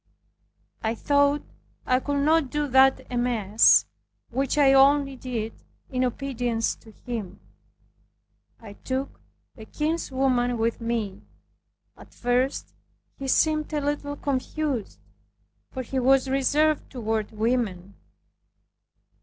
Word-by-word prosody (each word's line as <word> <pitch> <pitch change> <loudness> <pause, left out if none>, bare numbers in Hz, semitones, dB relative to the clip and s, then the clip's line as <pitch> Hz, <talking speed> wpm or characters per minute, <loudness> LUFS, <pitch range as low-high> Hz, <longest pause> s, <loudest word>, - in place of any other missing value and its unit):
I 220 +1 -1
thought 285 +3 +2 0.4
I 255 0 +2
could 285 +1 -1
not 315 -3 +3
do 295 +1 -1
that 265 +1 +4
amiss, 230 -4 +4 0.5
which 270 +3 -1
I 275 -2 +5
only 275 0 +4
did 235 -4 -4 0.4
in 255 -1 0
obedience 245 -3 -1
to 225 - -18 0.2
him. 215 -6 -5 1.2
I 215 -3 -11
took 260 +5 -5 0.4
a 220 - -10
kinswoman 260 -4 0
with 230 +1 -1
me. 225 -4 -3 0.7
At - - -17
first 250 +2 -1 0.5
he 275 - -5
seemed 305 +3 +2
a 300 - +1
little 285 0 -2
confused; 280 -3 -3 0.7
for 260 - -5
he 260 +2 -3
was 270 +1 +3
reserved 285 +3 +1
toward 220 -4 -2
women. 215 -4 -2
260 Hz, 110 wpm, -25 LUFS, 230-280 Hz, 1.2 s, I